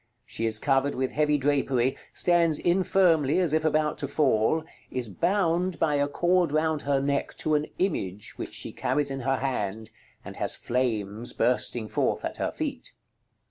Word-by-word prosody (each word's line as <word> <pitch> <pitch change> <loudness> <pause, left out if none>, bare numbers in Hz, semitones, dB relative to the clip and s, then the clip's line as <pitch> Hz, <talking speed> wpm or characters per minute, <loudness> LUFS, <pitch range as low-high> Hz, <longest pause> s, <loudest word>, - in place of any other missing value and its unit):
She 115 - -3
is 110 -1 +1
covered 135 +3 +1
with 130 0 -1
heavy 150 -1 +2
drapery, 135 -2 +1 0.2
stands 170 -3 +3
infirmly 175 -5 +2
as 175 -5 +2
if 155 0 +2
about 155 -1 +1
to 145 - -2
fall, 145 +1 +2 0.3
is 125 -2 -3
bound 175 - 0
by 155 -2 +1
a 145 0 +2
cord 175 +2 +1
round 155 0 +1
her 140 -1 +1
neck 140 0 -2
to 155 - -1
an 150 0 +1
image 105 - -2
which - - -6
she - - -4
carries 145 -2 -1
in 135 - -4
her 135 +1 0
hand, 110 -5 -3 0.3
and - - -8
has - - +1
flames 115 -3 -1
bursting 120 -2 +1
forth - - -1
at - - -4
her - - -2
feet. - - -5
145 Hz, 170 wpm, -26 LUFS, 125-160 Hz, 0.3 s, stands